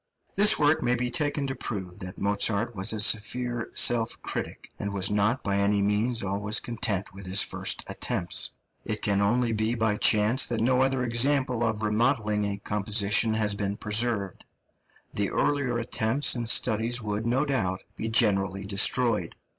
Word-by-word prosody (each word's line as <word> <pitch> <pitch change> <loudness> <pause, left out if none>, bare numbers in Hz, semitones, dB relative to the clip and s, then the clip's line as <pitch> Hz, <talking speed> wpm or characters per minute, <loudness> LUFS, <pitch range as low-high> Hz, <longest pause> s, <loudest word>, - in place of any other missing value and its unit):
This 210 +2 +5
work 150 +1 +2
may 120 0 +1
be 125 0 -2
taken 145 0 0
to 135 - -3
prove 95 -8 -6
that 90 0 -8
Mozart 105 +3 0
was 95 0 0
a 110 - -3
severe 115 +3 -1
self 115 -2 +3
critic, - - -6
and 100 - -3
was 100 -1 0
not 105 +5 +1
by 100 0 -1
any 100 +1 +2
means 105 +4 0
always 100 +2 -1
content 100 -5 -2
with 100 -1 -10
his 95 +2 +3
first - - -2
attempts. 85 - 0 0.3
It - - -3
can 100 -1 +1
only 115 +4 +1
be 110 +2 -1
by 110 -2 0
chance 110 +6 +3
that 120 - -2
no 125 +3 +2
other 130 -1 +1
example 125 0 +1
of 110 -2 -1
remodelling 105 -1 +1
a 100 0 -3
composition 105 +2 0
has 105 -2 +1
been 100 0 -3
preserved; 105 -3 -1 0.7
the 100 -1 -1
earlier 135 -5 0
attempts 115 +3 +1
and 120 -2 -1
studies 115 +1 +2
would, 110 0 -3
no 130 +5 +1
doubt, 95 -10 -1
be 110 - -4
generally 100 -4 +1
destroyed. 105 -1 +1
110 Hz, 165 wpm, -26 LUFS, 100-120 Hz, 0.7 s, This